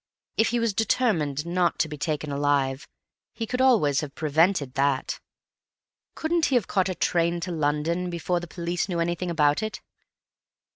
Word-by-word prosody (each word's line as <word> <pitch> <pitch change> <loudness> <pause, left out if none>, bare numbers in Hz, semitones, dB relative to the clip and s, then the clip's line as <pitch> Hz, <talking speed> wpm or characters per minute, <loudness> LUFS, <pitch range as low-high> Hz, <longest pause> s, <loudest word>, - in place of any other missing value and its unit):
If 220 - +3
he 240 - 0
was 230 -2 0
determined 170 - +1
not 175 0 +1
to - - +1
be 150 - -6
taken 150 0 -3
alive, 140 -1 0 0.5
he 230 - -4
could 250 +3 -2
always 210 - +4
have 145 -3 -7
prevented 155 -2 +2
that. 135 -1 0 1.0
Couldn't 325 +1 +1
he 270 - +1
have 235 -7 +3
caught 190 +1 +1
a 185 - -2
train 170 0 +1
to 180 - -3
London 160 +3 0
before 175 +1 -1
the 175 - -8
police 175 +3 -3
knew 175 -2 -1
anything 175 +1 -1
about 150 -3 +2
it?" 215 0 -4
170 Hz, 165 wpm, -25 LUFS, 150-190 Hz, 1.0 s, always